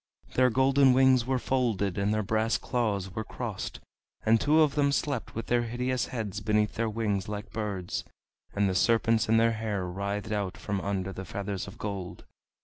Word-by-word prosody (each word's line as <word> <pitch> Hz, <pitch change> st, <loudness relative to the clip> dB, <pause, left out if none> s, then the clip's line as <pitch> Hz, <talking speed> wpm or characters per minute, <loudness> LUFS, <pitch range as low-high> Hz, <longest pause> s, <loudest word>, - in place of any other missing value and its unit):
Their 130 Hz, 0 st, +4 dB
golden 130 Hz, +2 st, +4 dB
wings 130 Hz, -2 st, +4 dB
were 130 Hz, 0 st, +2 dB
folded 115 Hz, -7 st, 0 dB
and 100 Hz, +1 st, +1 dB
their 110 Hz, 0 st, +1 dB
brass 110 Hz, +3 st, +1 dB
claws 100 Hz, -6 st, -1 dB
were 110 Hz, -, -3 dB
crossed, -, -, -5 dB, 0.5 s
and 110 Hz, 0 st, +4 dB
two 155 Hz, +2 st, +4 dB
of 145 Hz, -2 st, +1 dB
them 140 Hz, -1 st, +2 dB
slept 140 Hz, -3 st, -2 dB
with 115 Hz, 0 st, -3 dB
their 120 Hz, 0 st, +2 dB
hideous 125 Hz, +2 st, -1 dB
heads 105 Hz, -4 st, -4 dB
beneath 105 Hz, 0 st, +1 dB
their 115 Hz, 0 st, -1 dB
wings 105 Hz, -3 st, -1 dB
like 105 Hz, +1 st, -5 dB
birds, 100 Hz, -5 st, -3 dB, 0.5 s
and 100 Hz, 0 st, +2 dB
the 95 Hz, -, 0 dB
serpents 115 Hz, +2 st, +2 dB
in 115 Hz, -, +5 dB
their 115 Hz, 0 st, +4 dB
hair 105 Hz, -4 st, -2 dB
writhed 100 Hz, +3 st, -3 dB
out 100 Hz, -3 st, -2 dB
from 100 Hz, -2 st, -3 dB
under 95 Hz, -1 st, -2 dB
the 95 Hz, -, -6 dB
feathers 100 Hz, +1 st, -4 dB
of 100 Hz, -, -10 dB
gold. 100 Hz, -4 st, -5 dB
110 Hz, 185 wpm, -28 LUFS, 100-120 Hz, 0.5 s, in